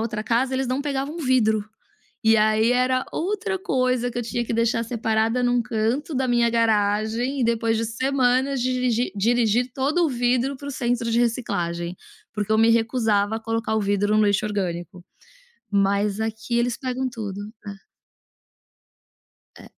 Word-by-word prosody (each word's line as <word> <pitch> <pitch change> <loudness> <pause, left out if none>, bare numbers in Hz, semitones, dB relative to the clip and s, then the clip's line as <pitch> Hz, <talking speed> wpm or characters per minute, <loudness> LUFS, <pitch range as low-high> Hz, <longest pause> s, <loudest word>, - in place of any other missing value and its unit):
outra 220 -1 -3
casa, 240 +4 0
eles 265 0 -1
não 255 +3 -1
pegavam 280 +2 -3
vidro. 235 -7 +2 0.6
E 225 0 +5
aí 215 +2 +3
era 255 +1 +2
outra 400 +2 -2
coisa 255 -6 0
que - - -7
eu - - -1
tinha 240 +1 -2
que 230 - -3
deixar 230 0 +1
separada 225 +1 0
em 245 - +2
um 245 0 +2
canto 230 +8 -2
da 260 0 0
minha 240 -1 +3
garagem 225 +3 +1
e - - +2
depois 230 -1 +1
de 225 - -1
semanas, 260 +2 +1
dirigi 250 -1 0
dirigir 235 +3 +2
todo 295 +6 +1
o - - 0
vidro 250 +2 0
para 285 - -9
o - - -4
centro 240 -2 -1
de 235 - +2
reciclagem, 175 -8 -2 0.4
porque 210 0 -3
eu 220 - +4
me 225 +1 +5
recusava 225 -2 +1
a - - -8
colocar 225 0 -2
o 220 - +1
vidro 205 +1 +1
no 215 - +4
lixo 205 +1 +1
orgânico. 180 -3 -4 0.7
Mas 200 +1 +1
aqui 220 +2 -2
eles 235 0 0
pegam 260 0 -3
tudo. 215 -5 -6 0.3
É. 200 - -5 1.9
É. - - -13
235 Hz, 165 wpm, -23 LUFS, 215-255 Hz, 1.9 s, E